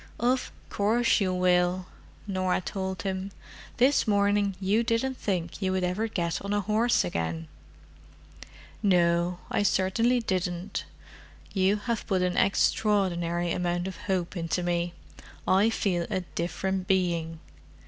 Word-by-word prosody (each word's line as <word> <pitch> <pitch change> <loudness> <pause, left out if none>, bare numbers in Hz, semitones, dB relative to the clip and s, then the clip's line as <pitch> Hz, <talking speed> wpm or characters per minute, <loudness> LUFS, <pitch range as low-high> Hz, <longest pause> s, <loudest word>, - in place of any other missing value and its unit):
"Of 250 +2 +1 0.2
course 225 +3 +2
you 190 -2 +1
will," 180 0 +2 0.4
Norah 185 -2 0
told 190 -1 -4
him. 190 0 -3 0.5
"This 260 +1 +3
morning 200 -1 +2
you 200 +4 +2
didn't 230 +3 0
think 180 -2 -3
you 190 -1 +1
would 185 -1 0
ever 180 +5 0
get 170 -6 -2
on 200 +1 -3
a 205 - +1
horse 220 +4 +2
again." 80 -2 -3 1.3
"No, 175 -3 +2
I - - +1
certainly 205 +5 +2
didn't. 185 -2 -2 0.7
You 195 +1 +3
have 215 +2 -3
put 190 -3 +1
an 180 0 0
extraordinary 175 -4 +1
amount 175 +1 -1
of 190 - -6
hope 185 -1 -2
into 170 +1 -1
me: 175 0 -1 0.5
I 195 +4 +4
feel 180 -6 0
a 185 - -1
different 185 +2 -2
being." 170 -4 0
190 Hz, 130 wpm, -27 LUFS, 175-205 Hz, 1.3 s, I